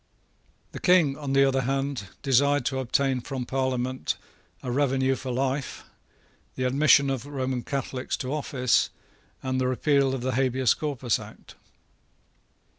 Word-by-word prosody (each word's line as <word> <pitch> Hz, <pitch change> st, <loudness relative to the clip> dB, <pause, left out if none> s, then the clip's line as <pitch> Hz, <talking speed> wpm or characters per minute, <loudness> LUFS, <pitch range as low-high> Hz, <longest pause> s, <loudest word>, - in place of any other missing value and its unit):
The -, -, -7 dB
King, 175 Hz, -7 st, +4 dB
on 140 Hz, -2 st, -4 dB
the 135 Hz, 0 st, +5 dB
other 135 Hz, 0 st, +1 dB
hand, 135 Hz, -4 st, -2 dB, 0.2 s
desired 140 Hz, 0 st, +3 dB
to 130 Hz, -1 st, -1 dB
obtain 130 Hz, 0 st, +1 dB
from 130 Hz, 0 st, -4 dB
the -, -, -9 dB
Parliament 130 Hz, 0 st, -1 dB, 0.5 s
a 125 Hz, -, -3 dB
revenue 135 Hz, 0 st, +2 dB
for 130 Hz, 0 st, -5 dB
life, 130 Hz, +2 st, -2 dB, 0.7 s
the 130 Hz, -, -2 dB
admission 140 Hz, +1 st, +4 dB
of 135 Hz, 0 st, -4 dB
Roman 130 Hz, -3 st, -2 dB
Catholics 130 Hz, -1 st, -3 dB
to 130 Hz, +2 st, -4 dB
office, 135 Hz, -5 st, +1 dB, 0.5 s
and 130 Hz, 0 st, -1 dB
the 130 Hz, -, +1 dB
repeal 135 Hz, +1 st, +2 dB
of 130 Hz, -, -5 dB
the 130 Hz, +1 st, -1 dB
Habeas 130 Hz, 0 st, +2 dB
Corpus 135 Hz, -6 st, -1 dB
Act. -, -, -12 dB
135 Hz, 145 wpm, -26 LUFS, 130-140 Hz, 0.7 s, the